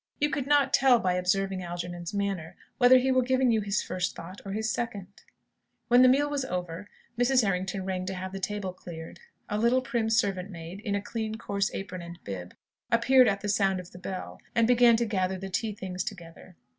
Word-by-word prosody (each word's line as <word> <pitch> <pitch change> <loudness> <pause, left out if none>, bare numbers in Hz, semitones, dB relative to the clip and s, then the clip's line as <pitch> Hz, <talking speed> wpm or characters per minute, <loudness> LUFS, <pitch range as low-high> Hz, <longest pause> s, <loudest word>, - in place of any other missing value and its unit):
You 295 0 +2
could 275 -1 -2
not 290 -1 +3
tell, 260 -2 +6
by 185 -5 0
observing 185 +1 0
Algernon's 175 -1 -5
manner, 195 -4 -3 0.2
whether 255 0 +8
he 260 +1 +2
were 255 0 +4
giving 255 0 +2
you 220 -1 +2
his 200 0 -1
first 180 0 -2
thought 185 +4 -9
or 195 - -6
his 220 +2 -2
second. 230 -5 -3 0.8
When 245 +1 +7
the 255 - +8
meal 280 +3 +3
was 290 -2 -1
over, 180 -2 -5 0.3
Mrs. 250 0 +4
Errington 190 0 -2
rang 185 -1 -3
to 190 - -3
have 185 +1 -5
the 195 - -5
table 195 -1 -3
cleared. 165 -3 -10 0.3
A 210 0 -2
little 245 +3 +3
prim 235 -3 -1
servant 200 -4 +1
maid, 170 +1 -8
in 205 -1 -2
a 200 - -2
coarse, 215 -3 -2
clean - - -5
apron 185 -2 -7
and 170 0 -9
bib, 90 -3 -7 0.4
appeared 250 +2 +5
at 200 -1 0
the 210 - -4
sound 195 -3 +2
of 180 0 -10
the 180 - -12
bell, 185 0 -6 0.2
and 230 -1 +4
began 240 -1 +6
to 235 - +1
gather 190 -3 -1
the 195 +1 -6
tea 215 +4 -1
things 185 -2 -4
together. 175 -2 -9
200 Hz, 210 wpm, -28 LUFS, 185-235 Hz, 0.8 s, whether